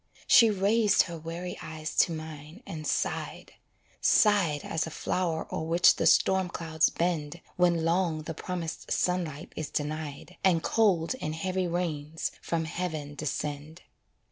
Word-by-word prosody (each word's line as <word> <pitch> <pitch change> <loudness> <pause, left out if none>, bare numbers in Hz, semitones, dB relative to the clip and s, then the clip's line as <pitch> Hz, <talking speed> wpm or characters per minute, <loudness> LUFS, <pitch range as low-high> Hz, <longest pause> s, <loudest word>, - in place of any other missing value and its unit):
She 230 -2 +7
raised 210 +2 +3
her 170 -2 -7
weary 170 +3 -6
eyes 160 0 -6
to - - +5
mine 155 - -8
and 155 -2 -6
sighed - - -2 0.5
Sighed 190 -9 +4
as 160 0 -2
a - - -4
flow'r 160 +1 -2
o'er - - -2
which 170 +1 +5
the - - +2
storm 190 -1 +4
clouds 160 -2 +1
bend 170 -2 -2 0.2
When 175 -2 +2
long 165 -2 +1
the 160 - -5
promised 170 0 -5
sunlight 175 -5 -1
is 155 - -4
denied, 155 +3 -4
And 170 -4 +3
cold 195 -6 +2
and 155 - -3
heavy 185 +2 -1
rains 160 -3 -3
from 165 -1 -1
heaven 160 -4 -4
descend. 150 +2 -5
165 Hz, 145 wpm, -28 LUFS, 155-180 Hz, 0.5 s, She